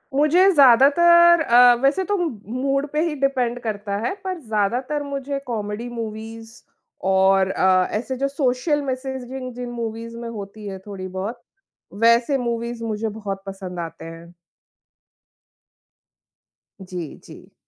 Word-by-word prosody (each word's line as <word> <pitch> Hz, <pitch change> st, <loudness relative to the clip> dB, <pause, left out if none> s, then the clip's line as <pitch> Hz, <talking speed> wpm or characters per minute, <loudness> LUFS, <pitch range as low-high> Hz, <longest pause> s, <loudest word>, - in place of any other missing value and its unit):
मुझे 320 Hz, +7 st, +5 dB
ज़्यादातर 335 Hz, +6 st, +6 dB
अ, 245 Hz, -3 st, +6 dB
वैसे 290 Hz, +8 st, +3 dB
तो 410 Hz, +2 st, -1 dB
मूड 275 Hz, -, -2 dB
पे 300 Hz, -, 0 dB
ही 310 Hz, -, -3 dB
डिपेंड 250 Hz, -3 st, 0 dB
करता 205 Hz, -3 st, -3 dB
है -, -, -1 dB
पर 375 Hz, -2 st, -4 dB
ज़्यादातर 245 Hz, +4 st, -1 dB
मुझे 280 Hz, 0 st, -4 dB
कॉमेडी 215 Hz, 0 st, -4 dB
मूवीज़ 225 Hz, -1 st, -7 dB, 0.6 s
और 190 Hz, 0 st, +4 dB
अ, 185 Hz, -1 st, +3 dB
ऐसे 245 Hz, +5 st, -3 dB
जो 275 Hz, +2 st, 0 dB
सोशल 275 Hz, +2 st, 0 dB
मेसेजिंग 260 Hz, -1 st, -5 dB
जिन 245 Hz, 0 st, -6 dB
मूवीज़ 230 Hz, 0 st, -6 dB
में 235 Hz, 0 st, -6 dB
होती 210 Hz, -1 st, -8 dB
है 190 Hz, -1 st, -6 dB
थोड़ी 190 Hz, -2 st, -6 dB
बहुत, 195 Hz, +6 st, -5 dB, 0.5 s
वैसे 235 Hz, +5 st, +3 dB
मूवीज़ 235 Hz, -1 st, -3 dB
मुझे 220 Hz, 0 st, -2 dB
बहुत 205 Hz, -2 st, -6 dB
पसंद 190 Hz, -2 st, -7 dB
आती 165 Hz, -1 st, -7 dB
हैं। 165 Hz, +1 st, -11 dB, 2.5 s
जी, 180 Hz, -4 st, -7 dB
जी। -, -, -15 dB
235 Hz, 130 wpm, -22 LUFS, 205-275 Hz, 2.5 s, ज़्यादातर